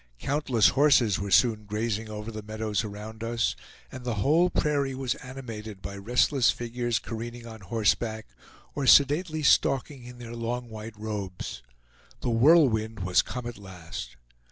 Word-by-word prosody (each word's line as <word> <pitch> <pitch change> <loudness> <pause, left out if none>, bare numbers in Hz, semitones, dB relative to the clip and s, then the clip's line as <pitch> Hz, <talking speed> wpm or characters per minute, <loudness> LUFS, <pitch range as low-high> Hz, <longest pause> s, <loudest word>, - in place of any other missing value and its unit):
Countless 130 - +2
horses 135 -8 +4
were 100 0 -3
soon 110 +1 +3
grazing 110 +1 -2
over 105 +1 -6
the 110 -1 -6
meadows 110 0 -2
around 110 +1 -8
us, 115 0 0 0.4
and 130 - -8
the 120 -2 -2
whole 155 - +3
prairie 140 -5 0
was 130 -2 -1
animated 115 -6 -8
by 100 +1 -7
restless 120 +5 +2
figures 120 0 -1
careening 115 +1 -6
on 110 -2 -10
horseback, 110 +2 0 0.5
or 140 -2 -2
sedately 155 +4 +4
stalking 135 0 +2
in 125 0 -11
their 120 -1 -8
long 120 +1 -3
white 110 0 -8
robes. 105 -4 -5 0.6
The 120 - -1
Whirlwind 115 - +4
was 90 0 +3
come 125 0 -6
at 120 -3 -6
last! 85 -10 -8
115 Hz, 150 wpm, -27 LUFS, 105-125 Hz, 0.6 s, horses